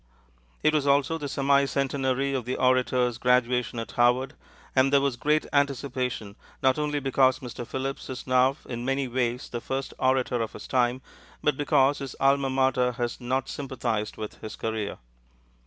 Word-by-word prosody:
It 155 - +4
was 145 -2 +1
also 140 +4 +2
the 145 -2 -4
semi 140 +1 +3
centenary 135 0 0
of 130 -4 -2
the 125 - -2
orator's 125 -2 +2
graduation 125 -1 +2
at 115 - -5
Harvard, 125 +3 +2 0.4
and 130 +1 +4
there 140 - +6
was 140 -2 0
great 150 +5 +1
anticipation, 130 -6 -1 0.3
not 130 +2 +3
only 150 -1 0
because 135 -1 +3
Mr. 120 -2 -7
Phillips 135 +1 -4
is 130 - -6
now 130 +2 +3
in 120 -1 -5
many 135 +1 0
ways 125 0 -1
the 120 - -5
first 135 +2 -4
orator 130 -2 +1
of 110 - -3
his - - -9
time, 125 0 +1 0.4
but 150 - +2
because 145 -1 +3
his 135 -2 -6
alma 135 0 +3
mater 130 -1 +2
has 120 +1 -3
not 130 +2 -1
sympathized 120 -6 -3
with 110 -1 -7
his 110 - -7
career. 110 -2 -3
130 Hz, 170 wpm, -26 LUFS, 125-140 Hz, 0.4 s, there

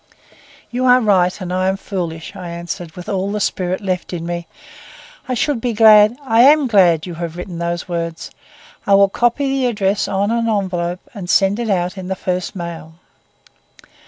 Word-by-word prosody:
"You 250 +1 -1
are 250 0 +6
right, 190 -5 +2
and 180 -2 -5
I 185 0 0
am 190 +1 0
foolish," 175 -3 -5
I 180 -3 -7
answered 170 -1 -6
with 180 +1 -9
all 195 -1 -2
the 210 - -2
spirit 185 -1 -2
left 185 -2 -3
in 170 -1 -4
me. 170 0 -4 0.8
"I 255 - 0
should 250 0 -1
be 245 -1 -1
glad—I 225 +3 +5
am 290 +3 +6
glad 185 -9 +4
that - - -8
you 180 - -6
have 170 0 -6
written 180 -1 -7
these 170 +1 -3
words. 170 -2 -4 0.6
I 200 - +5
will 200 0 +5
copy 240 +6 0
the 270 -1 0
address 205 -3 0
on 200 +2 0
an 230 0 0
envelope 185 -2 -2
and 190 -5 -8
send 195 +3 +3
it 235 -2 -2
out 180 -1 -1
in 185 - -7
the 190 - -2
first 180 0 -3
mail." 170 -3 -7
190 Hz, 190 wpm, -18 LUFS, 175-220 Hz, 0.8 s, are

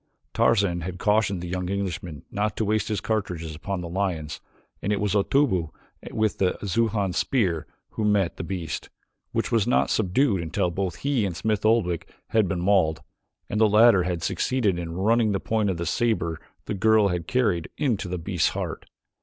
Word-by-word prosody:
Tarzan 100 -6 +2
had 90 +2 -5
cautioned 100 -2 +1
the - - -4
young 90 0 -3
Englishman 90 -6 -4
not 105 +1 -1
to 110 - 0
waste 105 0 +1
his 105 -2 -1
cartridges 90 -7 -2
upon 90 +4 -4
the 85 - -5
lions 85 -4 -2 0.4
and 100 - -1
it 105 - +1
was 105 -2 0
Otobu 100 - +2 0.4
with 110 -1 -1
the 95 -2 +2
Xujan 100 -1 0
spear 90 - 0 0.2
who 110 - -3
met 105 -4 +2
the - - -4
beast, 85 -3 -4 0.4
which - - -1
was 115 -2 +2
not 125 - +2
subdued 105 0 +2
until 85 +2 -1
both 95 -1 -2
he 140 -6 +2
and 90 -4 -2
Smith 105 +1 -1
Oldwick 90 -7 +1 0.2
had 110 -3 +3
been 90 -1 -2
mauled, 90 -5 +2 0.5
and 105 - -1
the 110 - +6
latter 105 -1 +6
had 90 -2 -2
succeeded 105 -7 0
in 85 -1 -5
running 110 +2 +3
the 95 - 0
point 110 -1 0
of 95 - -1
the 85 - -3
saber 85 -4 0 0.3
the - - -3
girl 110 +1 +4
had 90 -2 -3
carried, 105 -10 +1
into 120 -10 0
the 90 0 -3
beast's 90 0 0
heart. - - -5
100 Hz, 185 wpm, -25 LUFS, 90-110 Hz, 0.5 s, the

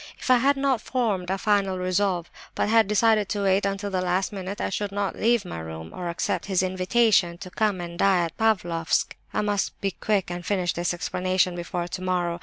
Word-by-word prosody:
If - - -1
I 250 - +7
had 275 +3 +3
not 270 -4 +1
formed 210 -9 -1
a 190 - 0
final 195 -2 +1
resolve, 185 -1 0 0.2
but - - 0
had 225 -2 +5
decided 210 0 +3
to 205 -2 -1
wait 195 +1 +3
until 200 +1 -3
the 185 -1 0
last 185 +2 0
minute, 195 +1 -5
I - - -2
should 205 +1 -2
not 200 -1 -2
leave 230 -2 +2
my 85 - -6
room, 80 0 -7
or 180 -1 -4
accept 170 - -2
his 190 -2 +1
invitation 185 -1 +2
to 185 0 -9
come 210 -3 0
and 170 0 -7
die 190 -3 +4
at 165 - -7
Pavlofsk. 175 -7 +1 0.2
I - - 0
must 205 -1 -1
be 195 - -1
quick 195 -1 -1
and 175 0 -5
finish 180 -3 0
this 175 +1 -1
explanation 185 +1 0
before 175 0 -3
tomorrow. 180 -1 -2
190 Hz, 210 wpm, -25 LUFS, 175-205 Hz, 0.2 s, I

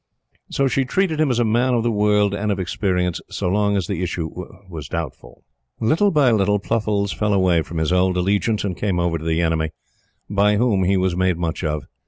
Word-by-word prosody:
So 140 - +1
she 135 +1 +1
treated 160 +3 0
him 155 - +2
as 125 - +1
a 120 - +2
man 120 +3 +2
of 115 - +1
the 120 - +1
world 105 -1 +2
and 105 +1 -1
of 100 - -2
experience 90 -1 -1
so - - -3
long 100 +1 +1
as 95 - -1
the 95 -1 -3
issue 85 -3 -3 0.4
was 80 -6 -7
doubtful. 80 -3 -6 0.4
Little 160 - +2
by 145 -8 +3
little, 105 -2 +2
Pluffles 105 -1 -1
fell 105 -1 0
away 90 -3 +3
from 85 +1 -7
his 80 +2 0
old 90 0 +2
allegiance 100 +4 +1
and 95 -3 -2
came 95 -3 -1
over 85 -1 0
to - - -9
the 80 +1 0
enemy, 80 -1 0 0.6
by 105 +1 +2
whom 105 -5 +2
he 95 +1 +2
was 90 -1 0
made 90 -1 +1
much 85 0 -3
of. 75 -2 -2
100 Hz, 215 wpm, -21 LUFS, 90-110 Hz, 0.6 s, by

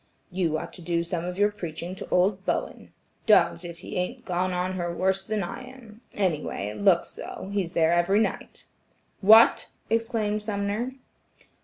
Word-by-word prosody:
"You 175 -4 0
ought - - -7
to 180 - -9
do 170 0 0
some 170 0 -3
of 180 0 -5
your 205 +1 +3
preaching 170 -3 -6
to 190 - -8
old 190 +2 +2
Bowen. - - -3 0.4
Dogged 170 -5 +4
if 170 -1 -7
he - - -5
ain't 180 0 -3
gone 180 +1 -1
on 180 +1 -1
her 175 -2 -2
worse 190 +2 0
than 215 -2 -1
I 175 - -6
am; 245 -4 -13
any 180 -7 +1
way, 100 -7 -4
it 105 0 -7
looks - - +4
so; 195 - -8
he's 190 -4 -1
there 165 0 +3
every 175 +4 +3
night." 220 - -3 0.5
"What!" 220 +3 +6 0.2
exclaimed 225 -2 0
Sumner. 210 +4 -2
185 Hz, 175 wpm, -26 LUFS, 175-210 Hz, 0.5 s, What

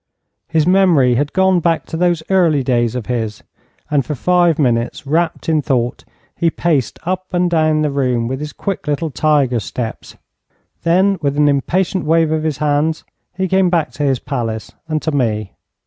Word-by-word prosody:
His 160 -2 +1
memory 175 -9 +4
had 145 +4 0
gone 190 -1 +3
back 165 -1 0
to - - -7
those 175 -1 +1
early 165 -7 +3
days 120 -2 0
of 125 -4 -4
his, 115 -3 -3 0.5
and 145 -2 +2
for 150 - -4
five 175 +3 +2
minutes, 120 +1 0
wrapped 160 +3 -1
in 160 -2 +2
thought, 125 -4 -1 0.3
he 170 -1 +1
paced 155 -8 -1
up 185 +2 -3
and 175 0 +1
down 155 -2 +2
the 150 - 0
room 125 -4 0
with 130 +2 -3
his 150 0 -5
quick 195 +2 -5
little 150 +2 -1
tiger 140 -5 +2
steps. 90 -7 -6 0.6
Then 190 +3 +2
with 140 -1 -1
an 150 0 +4
impatient 175 +6 0
wave 165 0 +2
of 160 0 0
his 155 -3 -2
hands 150 +1 0 0.3
he 190 +1 -1
came 190 0 +2
back 170 -3 0
to 145 - -4
his 135 -2 +2
palace 115 -5 -4 0.2
and 155 -1 -1
to 160 - -1
me. 110 -7 -1
155 Hz, 180 wpm, -17 LUFS, 130-170 Hz, 0.6 s, memory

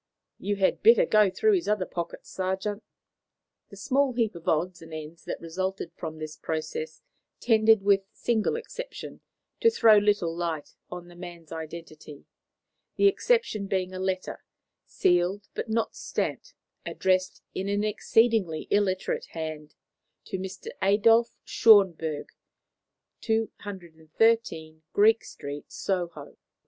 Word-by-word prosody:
"You 205 +1 -1
had 195 -1 +1
better 230 0 +6
go 210 -2 +4
through 430 - +2
his 365 -3 0
other 210 -3 +1
pockets, 170 -2 -6
sergeant." 190 +3 -2 0.9
The 200 - -12
small 270 +5 +1
heap 230 -3 0
of 170 -1 -12
odds 170 +2 0
and 165 0 -12
ends 155 +1 -8
that - - -4
resulted 185 +1 -4
from 160 -1 -6
this 155 0 -6
process 155 0 -4 0.4
tended, 220 -3 +4
with 200 -1 +5
a 195 - -40
single 225 - 0
exception, - - -7 0.4
to 460 - +5
throw 225 - +6
little 205 -5 +1
light 165 -3 -3 0.2
on 180 -1 -8
the 175 - -14
man's 175 -2 -10
identity; 160 -2 -9 0.7
the - - +2
exception 400 - +2
being 185 -1 -1
a 185 - -5
letter, 185 0 -3 0.4
sealed, 180 +3 +1
but 225 - -4
not 225 +1 -1
stamped, - - -4 0.3
addressed 185 0 0
in 195 +1 -3
an 205 +1 0
exceedingly 215 -5 +1
illiterate 195 -2 0
hand 155 -2 -6 0.5
to 190 - -4
Mr. 190 0 -7
Adolf 225 +4 +4
Schönberg, 170 -8 +4 0.9
213, 185 -5 -1
Greek 220 +2 +5
Street, 145 +1 -8
Soho. 175 -6 -4
190 Hz, 130 wpm, -27 LUFS, 165-215 Hz, 0.9 s, better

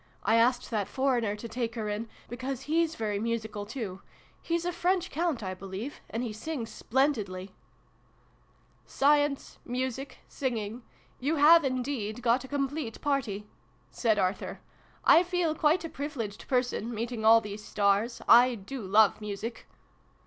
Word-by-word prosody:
I - - +2
asked 245 +2 +3
that 210 -3 0
foreigner 245 -6 +1
to 220 +3 -7
take 230 0 -3
her 220 -2 -3
in, 210 +2 -3 0.2
because 255 +2 -5
hes 325 +1 +1
very 210 -5 -2
musical, 220 -2 -3
too. 210 -6 -5 0.4
He's 340 0 -1
a 355 - 0
French 360 +1 0
Count, 315 -6 -1
I 185 -1 -3
believe; 195 +8 -7
and 230 +2 -3
he 230 -3 -3
sings 230 +1 -5
splendidly! 210 -8 -1 0.4
" - - -35
" - - -35 0.2
Science 290 0 +2
music 260 +2 -3
singing 235 -3 -3 0.4
you 290 +5 0
have 320 +3 +7
in 255 -2 0
deed 240 -4 -4
got 245 +2 +3
a - - -8
complete 275 -3 -3
party! 245 -9 -1 0.3
" - - -36
said 220 -4 +3
Arthur. 190 0 -1 0.3
" - - -29
I 335 - +8
feel 355 -3 0
quite 315 +3 +2
a - - -2
privileged 265 -9 -5
person, 250 -3 0
meeting 230 0 -3
all 225 +1 +8
these 210 -1 -7
stars. 205 +4 +1
I 245 +1 +7
do 230 +5 -7
love 210 +2 +4
music 210 +3 -5
240 Hz, 160 wpm, -29 LUFS, 215-280 Hz, 0.4 s, I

